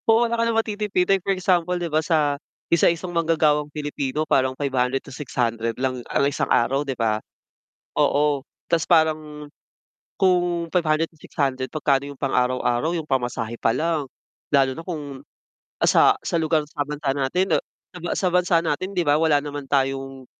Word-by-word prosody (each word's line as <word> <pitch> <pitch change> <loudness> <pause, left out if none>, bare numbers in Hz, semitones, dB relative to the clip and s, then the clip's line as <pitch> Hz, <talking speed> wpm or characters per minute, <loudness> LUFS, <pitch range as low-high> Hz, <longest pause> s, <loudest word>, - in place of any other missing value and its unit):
Oo, 225 +2 +5
wala 235 - -2
ka 230 0 +1
ng 225 - 0
matitipid, 210 -4 0
like 195 - +1
for 190 - -6
example 180 -2 +1
'di 175 - -3
ba, 155 - +3
sa 150 -3 +1 0.3
isa 170 - +5
isang 175 +1 -3
manggagawang 155 -3 +2
Pilipino 145 0 -3
parang 130 -3 +1
500 135 -2 0
to - - -11
600 115 -4 -2
lang 130 -1 -2
ang - - +2
isang 140 - -1
araw, 130 +4 +2
'di 135 -3 -4
ba? 110 -2 0 0.7
Oo 145 -1 +2 0.2
ta's 170 -1 +1
parang 155 -3 +1 0.7
kung 175 -3 +1
500 165 -2 +1
to 160 - -25
600 135 -5 -2
magkano 140 -1 0
yung 140 - -9
pang-araw-araw 125 +2 0
yung 160 - -3
pamasahe 120 -3 -2
pa 115 - +2
lang, 160 -1 0 0.5
lalo 135 -1 +5
na 145 - -7
kung, 145 -6 -6 0.6
ah, - - +2
sa, - - +5
sa - - -3
lugar 155 -1 +1
sa 150 0 -9
bansa 145 -1 -2
natin 140 +7 0 0.5
sa - - -7 0.3
sa - - +5
bansa 180 -1 +3
natin 165 +3 -2
'di 175 -3 +1
ba 145 - +4
wala 160 -3 +4
naman 145 -1 -6
tayong 135 -1 -1
150 Hz, 170 wpm, -23 LUFS, 135-170 Hz, 0.7 s, Oo